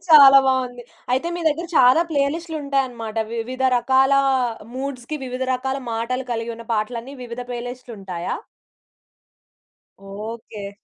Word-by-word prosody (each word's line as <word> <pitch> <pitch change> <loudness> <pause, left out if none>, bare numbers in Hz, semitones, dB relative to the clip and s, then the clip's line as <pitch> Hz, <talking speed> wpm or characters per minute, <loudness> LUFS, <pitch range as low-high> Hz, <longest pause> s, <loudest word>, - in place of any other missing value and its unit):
చాలా 275 -3 +10
బావుంది. 250 -2 0 0.3
అయితే, 265 +7 +1
మీ - - -4
దగ్గర 330 +3 -2
చాలా 255 +4 +7
ప్లేలిస్ట్‌లుంటాయనమాట. 280 -6 -1 0.2
వివిధ 255 +3 -4
రకాలా 265 +3 +4 0.6
మూడ్స్‌కి, 265 +1 -4
వివిధ 255 0 -4
రకాల 265 +2 -2
మాటలు 245 +3 -2
కలిగి 230 0 -3
ఉన్న 230 0 -11
పాటలన్నీ 230 +5 -3
వివిధ 235 +1 -6
ప్లేలిస్ట్‌లుంటాయా? 235 -8 -5 1.6
ఓకే. 205 +1 -7
250 Hz, 105 wpm, -22 LUFS, 230-275 Hz, 1.6 s, చాలా